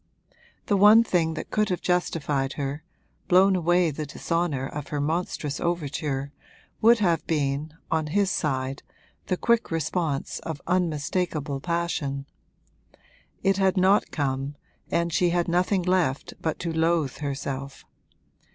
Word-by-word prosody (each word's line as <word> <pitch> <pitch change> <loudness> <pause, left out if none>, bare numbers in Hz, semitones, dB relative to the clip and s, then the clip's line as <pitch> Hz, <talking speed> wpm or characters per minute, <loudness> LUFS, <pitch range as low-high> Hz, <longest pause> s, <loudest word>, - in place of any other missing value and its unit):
The 205 - +2
one 210 +3 +8
thing 165 -7 +1
that 155 - -6
could 215 -1 +1
have 180 - -1
justified 150 -6 0
her, 145 +1 -4 0.4
blown 190 +2 +5
away 175 -1 +2
the 150 +1 -5
dishonour 160 -2 -1
of 145 +1 -6
her 145 - -3
monstrous 150 -1 -2
overture, 145 -4 -2 0.5
would 235 +2 +7
have 170 -7 +1
been, 150 0 -1 0.2
on 160 -1 +1
his 195 +4 +1
side, 135 -4 -1 0.5
the 185 - 0
quick 235 +2 +2
response 160 -2 -2
of 160 -3 -6
unmistakable 160 -3 -1
passion. 155 -4 -2 1.2
It 195 0 +3
had 190 0 +2
not 190 +3 +4
come, 135 -1 -2 0.3
and 170 0 0
she 175 +2 +3
had 175 0 +1
nothing 180 +2 +1
left 175 -7 0
but 160 - -1
to 165 -1 -2
loathe 160 -4 +1
herself. 140 -1 -5
165 Hz, 135 wpm, -26 LUFS, 145-180 Hz, 1.2 s, one